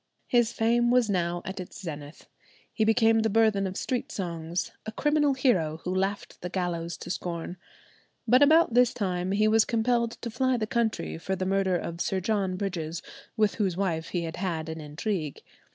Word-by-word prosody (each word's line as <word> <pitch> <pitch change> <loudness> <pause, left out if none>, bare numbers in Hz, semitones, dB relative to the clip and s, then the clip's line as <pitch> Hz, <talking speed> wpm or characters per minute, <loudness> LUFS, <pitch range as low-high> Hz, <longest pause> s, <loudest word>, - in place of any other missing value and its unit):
His 240 -2 +3
fame 235 +1 +2
was 245 -3 +3
now 175 -2 -1
at 190 +1 -5
its 180 - -8
zenith. 150 -4 -8 0.5
He 220 - +1
became 225 0 +4
the 220 0 +2
burthen 215 -2 +3
of 185 - -5
street 250 -2 -2
songs—a 170 +3 -4
criminal 295 +1 +2
hero 180 - +2
who 180 - -2
laughed 195 +2 -2
the 180 - -4
gallows 170 -2 -2
to - - -6
scorn. 175 -1 -4 0.7
But 250 +4 +5
about 310 -2 +6
this 245 0 +4
time 185 -3 -1
he 210 +2 +3
was 220 0 +5
compelled 235 0 +1
to 235 - -3
fly 255 +2 +1
the 220 - -1
country 230 -7 -1
for 190 +3 -2
the 185 0 -2
murder 190 -1 +2
of 170 0 -5
Sir 190 - 0
John 195 -1 0
Bridges, 175 -4 -3 0.3
with 215 -2 +3
whose 185 -4 0
wife 170 -5 -1
he 175 -2 -2
had 165 0 -5
had 165 -4 -2
an 160 0 -5
intrigue. 155 +1 -4
195 Hz, 185 wpm, -27 LUFS, 175-225 Hz, 0.7 s, about